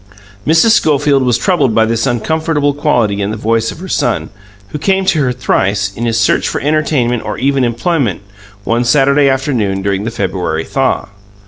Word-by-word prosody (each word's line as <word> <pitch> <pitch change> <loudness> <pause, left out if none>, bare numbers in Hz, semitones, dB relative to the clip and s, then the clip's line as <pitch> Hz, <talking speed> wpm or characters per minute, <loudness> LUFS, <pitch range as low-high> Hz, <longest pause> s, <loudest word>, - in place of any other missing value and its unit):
Mrs. 165 +8 +4
Schofield 145 -6 +2
was 125 -2 +2
troubled 145 - +1
by 110 - +4
this 115 0 -1
uncomfortable 145 +4 0
quality 120 -9 0
in 100 - -1
the 110 - -4
voice 115 +1 0
of - - -10
her 190 - -7
son, 120 -9 -1 0.4
who 150 - -6
came 190 +4 +1
to 180 -5 +2
her 130 -2 +1
thrice, 100 -5 -1
in 120 +1 -3
his 115 -1 0
search 105 - +2
for - - -2
entertainment 140 -5 0
or - - -4
even 135 +1 +1
employment, 120 - -1 0.4
one 115 +3 0
Saturday 140 +2 +3
afternoon 120 -8 -1
during 100 0 -1
the 115 - -2
February 90 -6 -2
thaw. - - -1
125 Hz, 180 wpm, -14 LUFS, 110-150 Hz, 0.4 s, Mrs